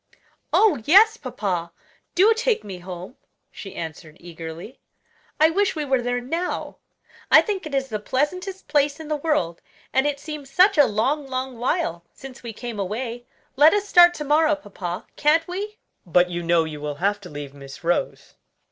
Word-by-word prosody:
"Oh, 390 Hz, -, +4 dB
yes, 430 Hz, +7 st, +7 dB
papa, 195 Hz, -, -3 dB, 0.4 s
do 410 Hz, +5 st, +6 dB
take 455 Hz, -, 0 dB
me 195 Hz, -3 st, -8 dB
home," 180 Hz, +5 st, -9 dB, 0.3 s
she 195 Hz, -, -10 dB
answered 160 Hz, -1 st, -7 dB
eagerly. 170 Hz, +4 st, -9 dB, 0.6 s
"I 315 Hz, +1 st, +5 dB
wish 395 Hz, +2 st, +1 dB
we 305 Hz, -2 st, -2 dB
were 265 Hz, -2 st, +1 dB
there 245 Hz, 0 st, -1 dB
now. 330 Hz, +9 st, -4 dB, 0.5 s
I -, -, +8 dB
think 390 Hz, -6 st, -3 dB
it 285 Hz, -, -4 dB
is 270 Hz, 0 st, 0 dB
the 215 Hz, -2 st, -3 dB
pleasantest 365 Hz, -, -2 dB
place 290 Hz, 0 st, +1 dB
in 315 Hz, -1 st, -8 dB
the 305 Hz, -, +1 dB
world 285 Hz, -, -1 dB, 0.3 s
and 265 Hz, +2 st, +3 dB
it 285 Hz, -1 st, -2 dB
seems 300 Hz, -2 st, -8 dB
such 370 Hz, +8 st, +5 dB
a 290 Hz, -, +8 dB
long, 265 Hz, +7 st, 0 dB
long 260 Hz, -2 st, -4 dB
while 240 Hz, -, -1 dB
since 265 Hz, -1 st, -11 dB
we 235 Hz, -, -6 dB
came 230 Hz, 0 st, -7 dB
away. 235 Hz, +5 st, -4 dB, 0.3 s
Let 300 Hz, +7 st, +6 dB
us 410 Hz, 0 st, -1 dB
start 350 Hz, -2 st, +7 dB
to 300 Hz, -, -4 dB
morrow, 305 Hz, +1 st, +3 dB
papa; 190 Hz, -9 st, -6 dB
can't 315 Hz, +2 st, +3 dB
we?" 410 Hz, +4 st, -5 dB, 0.3 s
"But 180 Hz, +1 st, +2 dB
you 175 Hz, 0 st, -3 dB
know 170 Hz, -1 st, +3 dB
you 155 Hz, -2 st, -7 dB
will 150 Hz, -1 st, -4 dB
have 200 Hz, +6 st, 0 dB
to 180 Hz, -, -10 dB
leave 145 Hz, -2 st, -8 dB
Miss 140 Hz, +1 st, -12 dB
Rose." 175 Hz, +1 st, -1 dB
260 Hz, 180 wpm, -23 LUFS, -, 0.6 s, I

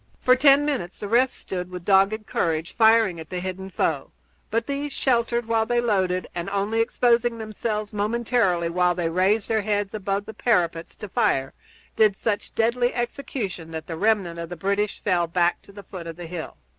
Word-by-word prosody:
For 255 Hz, -, +5 dB
ten 280 Hz, +2 st, +5 dB
minutes 255 Hz, -12 st, -2 dB
the 205 Hz, -, -5 dB
rest 245 Hz, +4 st, +3 dB
stood 180 Hz, -1 st, -5 dB
with 180 Hz, -1 st, -8 dB
dogged 200 Hz, +2 st, +3 dB
courage, 165 Hz, -3 st, -1 dB
firing 220 Hz, -6 st, +4 dB
at 160 Hz, -, -9 dB
the 180 Hz, -, -3 dB
hidden 190 Hz, +1 st, -5 dB
foe, -, -, -1 dB, 0.4 s
but 230 Hz, +1 st, 0 dB
these, 280 Hz, +1 st, -3 dB
sheltered 235 Hz, -3 st, +1 dB
while 225 Hz, -1 st, +1 dB
they 240 Hz, 0 st, +2 dB
loaded 190 Hz, -6 st, 0 dB
and 175 Hz, +1 st, -4 dB
only 200 Hz, +3 st, 0 dB
exposing 240 Hz, 0 st, +2 dB
themselves 215 Hz, -1 st, -4 dB
momentarily 210 Hz, -4 st, +1 dB
while 175 Hz, +1 st, +2 dB
they 170 Hz, -2 st, -1 dB
raised 190 Hz, +5 st, +2 dB
their 220 Hz, -1 st, +1 dB
heads 205 Hz, -1 st, -1 dB
above 200 Hz, -1 st, -2 dB
the 220 Hz, -, -8 dB
parapets 170 Hz, -9 st, 0 dB
to 210 Hz, -, -8 dB
fire, 135 Hz, -7 st, 0 dB, 0.4 s
did 215 Hz, -3 st, +4 dB
such 210 Hz, 0 st, -3 dB
deadly 240 Hz, +2 st, +2 dB
execution 240 Hz, -, -4 dB
that 160 Hz, -1 st, -6 dB
the 165 Hz, -, -5 dB
remnant 195 Hz, -3 st, +1 dB
of 170 Hz, -1 st, -5 dB
the 175 Hz, -, -7 dB
British 200 Hz, +4 st, -1 dB
fell 175 Hz, -4 st, +1 dB
back 175 Hz, +1 st, +1 dB
to -, -, -17 dB
the 200 Hz, 0 st, -11 dB
foot 180 Hz, -4 st, -8 dB
of 165 Hz, -, -6 dB
the 175 Hz, +1 st, -8 dB
hill. 165 Hz, -1 st, -7 dB
205 Hz, 190 wpm, -24 LUFS, 180-230 Hz, 0.4 s, For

